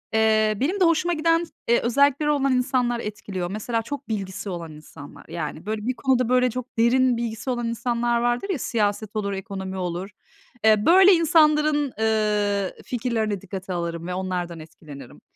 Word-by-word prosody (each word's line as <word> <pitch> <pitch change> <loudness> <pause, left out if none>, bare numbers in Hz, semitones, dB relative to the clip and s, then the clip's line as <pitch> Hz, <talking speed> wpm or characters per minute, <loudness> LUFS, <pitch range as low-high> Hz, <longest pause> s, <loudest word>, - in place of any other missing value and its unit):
ııı, 215 -1 +3
benim 345 +10 0
de 370 - +5
hoşuma 335 +1 +2
giden, 330 +1 +2 0.3
ııı, 235 - +5
özellikleri 280 +4 +2
olan 275 -3 +2
insanlar 250 -1 +1
etkiliyor. 200 -4 -5
Mesela, 225 +2 -2
çok 280 +2 -7
bilgisi 195 -1 -4
olan 170 -3 -6
insanlar. 150 -1 -13
Yani, 165 +1 -6
böyle, 215 0 -3
bir 255 - +1
konuda 255 -1 +2
çok 250 0 -7
derin 245 +1 +3
bilgisi 230 +1 -4
olan 240 -2 -1
insanlar 235 0 0
vardır 240 +11 0
ya, 335 -9 -1
siyaset 210 -2 -1
olur, 200 -2 -2
ekonomi 190 -1 -6
olur. 180 +2 -4 0.6
Iıı, 215 -1 +4
böyle 380 +3 +7
insanların, 305 -4 +3
ııı, 210 -3 +1
fikirlerini 225 -5 -2
dikkate 190 -1 -6
alırım 170 -1 -4
ve 180 - -3
onlardan 180 -2 -3
etkilenirim. 150 -4 -12
225 Hz, 155 wpm, -24 LUFS, 195-255 Hz, 0.6 s, böyle